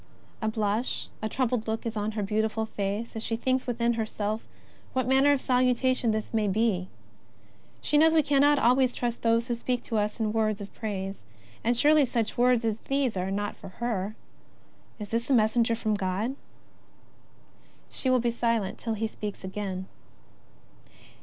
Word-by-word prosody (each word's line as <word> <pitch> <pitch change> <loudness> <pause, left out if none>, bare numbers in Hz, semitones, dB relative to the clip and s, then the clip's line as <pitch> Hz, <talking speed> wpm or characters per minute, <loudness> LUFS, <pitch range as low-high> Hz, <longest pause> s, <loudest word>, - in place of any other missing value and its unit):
A 220 - 0
blush, 215 +2 -1
a 220 - -2
troubled 245 -2 0
look 220 +1 -2
is 230 -1 -3
on. 210 +1 -2
her 210 -1 -2
beautiful 220 +2 0
face 210 +2 -3
as 220 - -3
she 225 - -1
thinks 260 +3 0
within 235 -1 +1
herself 215 -1 -3 0.5
what 255 -2 0
manner 270 +2 +5
of 285 - +3
salutation 255 -1 +2
this 220 +1 -2
may 215 -2 +2
be. 200 -3 +1 0.9
She 295 - +3
knows 320 +1 +5
we 315 - +5
can 280 -1 +2
^ - - +6
not 290 +1 +5
always 250 +1 +3
trust 240 -1 -2
those 230 +1 +2
who 240 - 0
speak 245 +1 -2
to 225 - -2
us 210 +2 -2
in 215 -1 0
words 215 -2 +1
of 200 -1 -8
praise, 195 -3 -4 0.4
and 235 +1 +2
surely 300 +3 +5
such 230 -2 -1
words 245 -1 +3
as 220 -1 0
these 275 -4 0
are 185 0 -1
not 205 +1 -2
for - - -10
her. 215 -3 -2 0.8
Is 210 -2 -7
this 230 +2 -1
a 270 - +5
messenger 230 +1 +3
from 220 -1 -1
God? 205 +5 -1 1.6
She 260 - -1
will 255 -1 +4
be 240 0 +1
silent 230 -4 -1
till 225 -2 -2
he 220 +1 -1
speaks 210 -3 -6
again. 190 -1 -4
225 Hz, 180 wpm, -28 LUFS, 210-245 Hz, 1.6 s, ^